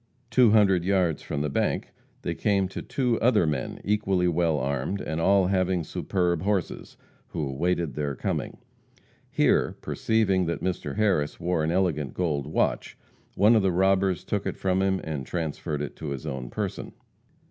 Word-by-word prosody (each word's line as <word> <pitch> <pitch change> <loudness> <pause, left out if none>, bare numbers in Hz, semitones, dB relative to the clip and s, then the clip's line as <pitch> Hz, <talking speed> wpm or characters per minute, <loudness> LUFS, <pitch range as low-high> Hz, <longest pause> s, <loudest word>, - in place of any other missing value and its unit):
Two 125 -3 +6
hundred 100 -5 +4
yards 90 -5 +1
from 70 - -3
the - - 0
bank - - -1 0.3
they - - -1
came 100 -2 +1
to - - -6
two 125 -4 0
other 120 -7 +4
men 75 -5 -2
equally 95 -3 +1
well 85 -2 +1
armed, 70 +8 -2
and 80 -1 -3
all 100 +2 +4
having 95 -2 +1
superb 85 +1 -1
horses, 95 -2 -2 0.3
who 80 -4 -3
awaited 85 +2 -1
their 70 0 -2
coming. - - -3 0.7
Here, - - +2
perceiving 100 -5 +1
that 85 - -3
Mr. 90 -1 -2
Harris 95 -9 +1
wore 85 -2 0
an 80 - 0
elegant 85 -6 0
gold 75 -6 -1
watch, 75 - -1 0.4
one 105 +5 +5
of 110 - +4
the 95 -1 +2
robbers 95 -1 +2
took - - -2
it - - -3
from 95 0 +1
him, 95 -1 +1
and 75 -4 -4
transferred 80 -1 -3
it 75 - -6
to 80 - -6
his 70 +2 -5
own 65 -5 -4
person. - - -4
90 Hz, 170 wpm, -26 LUFS, 75-95 Hz, 0.7 s, Two